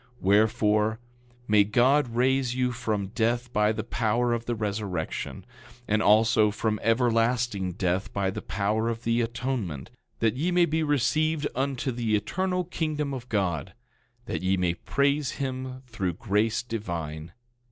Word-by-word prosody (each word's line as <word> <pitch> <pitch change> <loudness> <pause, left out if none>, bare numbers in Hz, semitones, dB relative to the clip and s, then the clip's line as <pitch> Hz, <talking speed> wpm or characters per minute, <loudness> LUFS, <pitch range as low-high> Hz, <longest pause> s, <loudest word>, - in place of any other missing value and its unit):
10:25 - - -28
Wherefore, 105 +2 +3 0.5
may 105 -1 +5
God 125 +4 +2
raise 130 0 +2
you 125 -1 +1
from 110 -5 -2
death 120 +2 -1
by 105 0 +3
the 110 -1 -3
power 120 +1 0
of 115 0 -3
the 120 - -1
resurrection, 100 -6 -3 0.4
and 105 +1 +2
also 110 0 +5
from 105 0 -1
everlasting 115 -4 +1
death 95 +1 -1
by 95 -1 0
the - - -5
power 105 +3 -1
of 115 0 -4
the 115 +1 +1
atonement, 115 - -3 0.3
that 115 -2 +2
ye 155 +7 0
may 175 -1 +4
be 160 0 0
received 155 +1 +1
into 135 0 -1
the 115 -3 0
eternal 180 - -1
kingdom 155 -4 -2
of 130 -1 -7
God, 95 -6 -1 0.5
that - - -3
ye 95 +1 +1
may 90 -2 +1
praise 140 - 0
him 130 -1 -4
through 100 -7 -3
grace 105 +5 0
divine. 85 -8 -5
115 Hz, 150 wpm, -27 LUFS, 105-130 Hz, 0.5 s, may